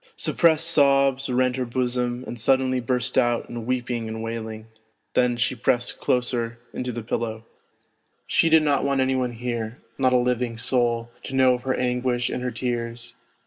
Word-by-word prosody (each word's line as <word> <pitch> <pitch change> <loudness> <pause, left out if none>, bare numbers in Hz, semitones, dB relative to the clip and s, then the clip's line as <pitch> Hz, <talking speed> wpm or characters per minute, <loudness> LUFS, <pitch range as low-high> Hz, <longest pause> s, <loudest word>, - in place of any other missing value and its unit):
Sup - - -1
pressed 165 -1 +4
sobs 140 -3 +3
rent 125 0 +1
her 130 - 0
bosom 125 0 -1
and 120 - -6
suddenly 130 +1 +2
burst 125 +1 0
out 120 -1 +1
in 120 -1 -7
weeping 120 -2 -2
and 110 0 -5
wailing, 110 -1 -5 0.5
then 125 -1 +2
she 125 +2 +1
pressed 125 0 0
closer 120 -2 0 0.2
into 125 0 -3
the 120 -1 -5
pillow: 110 0 -3 0.8
she 165 - +3
did 160 -1 +6
not 145 -2 +2
want 140 -1 +1
any 130 0 +2
one 125 -2 -1
here, 115 -1 -4 0.2
not 130 -1 +3
a 125 - +5
living 125 -1 0
soul, 120 0 0
to 135 - -6
know 130 -1 +5
of 125 - -3
her 130 0 -1
anguish 125 0 0
and - - -3
her 125 - -1
tears. 120 0 -4
125 Hz, 180 wpm, -24 LUFS, 120-130 Hz, 0.8 s, did